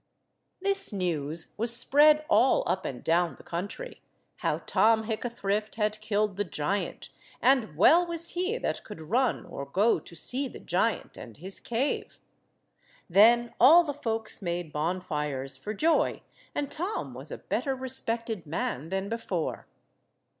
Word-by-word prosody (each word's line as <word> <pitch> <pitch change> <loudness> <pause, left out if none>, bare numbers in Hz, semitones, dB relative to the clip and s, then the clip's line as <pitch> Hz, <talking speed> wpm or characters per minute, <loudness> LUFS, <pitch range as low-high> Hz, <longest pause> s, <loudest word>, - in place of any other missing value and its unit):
This 395 -3 +2
news 165 -5 -2
was 235 +1 +3
spread 300 +3 +5
all 270 -5 +4
up 190 - -1
and 125 - -5
down 170 +1 +2
the - - -16
country, 200 - -6 0.4
how - - -1
Tom 220 +3 +3
Hickathrift 215 -2 -2
had 215 -1 -1
killed 210 -2 0
the 205 - +1
giant, 180 +3 -3 0.3
and 250 - +2
well 330 - +6
was 335 0 -1
he 370 +6 -1
that - - -3
could 210 - -10
run 250 +1 +1
or 140 - -7
go 190 +9 +2
to 170 - -13
see 260 - -2
the - - -10
giant 195 +5 -1
and 115 -3 -10
his 190 +5 -7
cave. 245 +5 -2 0.9
Then 230 +6 +5
all 320 +8 +8
the 295 -3 -3
folks 225 -6 -3
made 170 -4 -3
bonfires 150 -5 -2
for 135 +11 -6
joy, 315 +10 +1 0.3
and 285 -1 -2
Tom 375 +7 -3
was - - -8
a - - -5
better 270 -2 -2
respected 230 -7 -3
man 150 -1 -3
than 190 +1 -2
before. 200 -7 -3
215 Hz, 145 wpm, -28 LUFS, 175-260 Hz, 0.9 s, all